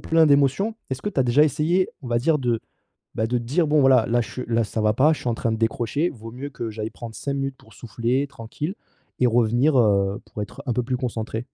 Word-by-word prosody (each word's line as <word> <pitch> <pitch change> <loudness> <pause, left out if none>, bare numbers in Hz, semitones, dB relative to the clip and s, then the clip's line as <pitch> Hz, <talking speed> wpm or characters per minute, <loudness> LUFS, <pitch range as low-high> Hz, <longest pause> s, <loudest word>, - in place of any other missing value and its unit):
plein 165 0 +4
d'émotions. 145 - +3 0.2
Est-ce 130 0 -3
que - - -1
tu 180 - -4
as - - +5
déjà 125 +4 +4
essayé, 165 +5 +1
on 130 - -8
va 120 0 +2
dire, 150 +5 +2
de, 120 -4 0 0.6
bah, 110 - 0
de 125 +2 0
dire: 145 +8 0
«Bon 150 -1 +3
voilà 130 -3 +5
là, 120 +1 +2
je 115 - -7
suis 125 - -5
là, 115 0 +2
ça 110 +1 -4
va 105 0 +3
pas, 140 +8 +4
je - - -5
suis - - -6
en - - +1
train 115 - -1
de 110 - -1
décrocher, 115 +7 0
vaut 115 -5 -10
mieux 130 +4 -6
que 120 -4 -5
j'aille 110 0 -4
prendre 115 -2 -9
5 140 - -3
minutes 135 -1 -3
pour 110 - -20
souffler 120 +4 -1
tranquille 140 - -6 0.4
et 125 - +4
revenir, 120 +5 +3
heu, 100 -3 +2
pour 105 - -7
être 105 +7 -10
un - - +1
peu 125 - 0
plus 125 +1 -1
concentrée»? 115 -3 -3
125 Hz, 255 wpm, -23 LUFS, 115-140 Hz, 0.6 s, as